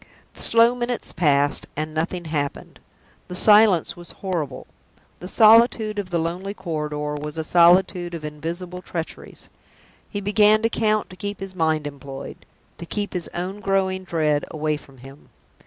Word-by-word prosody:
The - - -10
slow 230 +1 +4
minutes 245 0 -3
passed, 145 -4 +2
and 155 +1 -3
nothing 170 +2 -2
happened. 145 -3 -4 0.5
The 180 - -7
silence 210 -3 +5
was 175 0 -12
horrible; 160 -9 -4 0.5
the 180 - -8
solitude 220 0 +5
of 195 -3 -5
the 175 - 0
lonely 180 +5 -3
corridor 150 -5 -3
was 150 +1 -6
a 160 - -1
solitude 175 +1 +4
of 155 -2 -7
invisible 170 +4 -6
treacheries. 165 -3 -7 0.6
He 205 - -4
began 210 +2 +3
to 225 - +3
count 215 -3 0
to - - -10
keep 205 +2 -5
his 195 0 -7
mind 160 -3 0
employed 140 -1 -9 0.3
to 170 - -8
keep 205 +2 -3
his 180 -2 -3
own 185 +4 -4
growing 190 -1 0
dread 155 -5 0
away 155 -1 -1
from 135 -2 -14
him. 135 +3 -14
175 Hz, 155 wpm, -23 LUFS, 155-200 Hz, 0.6 s, silence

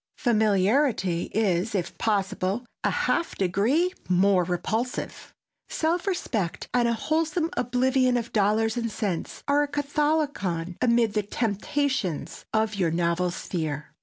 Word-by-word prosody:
Familiarity 210 - +2
is, 205 -1 +1
if 180 -3 -2
possible, 200 +1 0 0.2
a - - +3
half 335 - 0
degree 235 - +1 0.2
more 185 0 +4
repulsive. 215 +8 -3 0.4
Self 340 +4 0
respect 225 - -2
and 245 -1 +3
a 235 - +2
wholesome 320 +6 0
oblivion 255 0 +2
of 235 -1 -4
dollars 220 +2 +2
and 230 -1 -1
cents 195 -7 -3
are 285 +1 +3
a 290 - +1
catholicon 285 - -1
amid 235 -3 +3
the 210 - +1
temptations 220 - -2
of 220 0 +1
your 185 -4 +1
novel 170 +2 +1
sphere. 155 -4 -4
220 Hz, 125 wpm, -26 LUFS, 185-270 Hz, 0.4 s, more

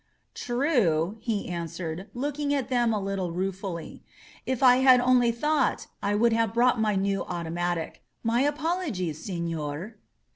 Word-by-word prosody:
^True," 225 - +1
he 220 -2 -2
answered, 170 +2 -5
looking 285 +3 -2
at 275 -2 -2
them 240 -2 +2
a 215 - 0
little 195 -3 -2
rue 185 +3 -1
fully. 185 -3 -7 0.5
"If 260 0 -1
I 250 -1 +7
had 260 -1 +6
only 245 -1 +4
thought 300 +7 0 0.2
I 205 +1 0
would 230 +2 +3
have 225 -1 +1
brought 245 -1 +3
my 215 -2 +1
new 195 0 0
automatic. 175 0 -3 0.2
My 230 +2 +2
apologies, 290 - -1
senor." 170 +2 -4
215 Hz, 145 wpm, -27 LUFS, 175-250 Hz, 0.5 s, I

